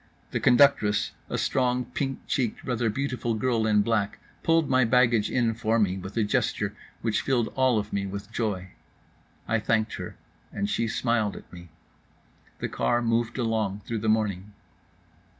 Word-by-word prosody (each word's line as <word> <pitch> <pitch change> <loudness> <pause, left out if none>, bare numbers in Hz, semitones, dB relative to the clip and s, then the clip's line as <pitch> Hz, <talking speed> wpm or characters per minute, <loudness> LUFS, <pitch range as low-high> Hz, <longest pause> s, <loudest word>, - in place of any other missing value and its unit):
The - - -1
conductress, 120 -6 +4 0.2
a - - -2
strong, 125 -1 +1
pink 135 +2 -4
cheeked, 125 -5 -1
rather 120 -2 0
beautiful 125 -1 -2
girl 115 -1 +1
in 105 -1 +4
black, 105 -3 0 0.2
pulled 165 -2 +3
my 130 -1 +4
baggage 120 -2 +3
in 120 -3 +1
for 110 0 0
me 100 -4 +2
with 95 +4 -8
a 115 - +3
gesture 105 -2 0 0.3
which 110 -2 +1
filled 120 -4 +1
all 130 -3 +2
of 105 0 -3
me 100 0 -1
with 100 +2 -7
joy. 105 -6 -2 0.8
I 115 - +2
thanked 110 0 0
her, - - -7 0.4
and 100 0 -2
she 105 +3 0
smiled 110 -3 0
at - - -12
me. 85 -1 -11 0.9
The - - -3
car 90 - 0
moved 115 +1 0
along 110 -4 -1
through 115 -2 -2
the 110 +1 -1
morning. 105 -2 0
115 Hz, 165 wpm, -26 LUFS, 105-125 Hz, 0.9 s, conductress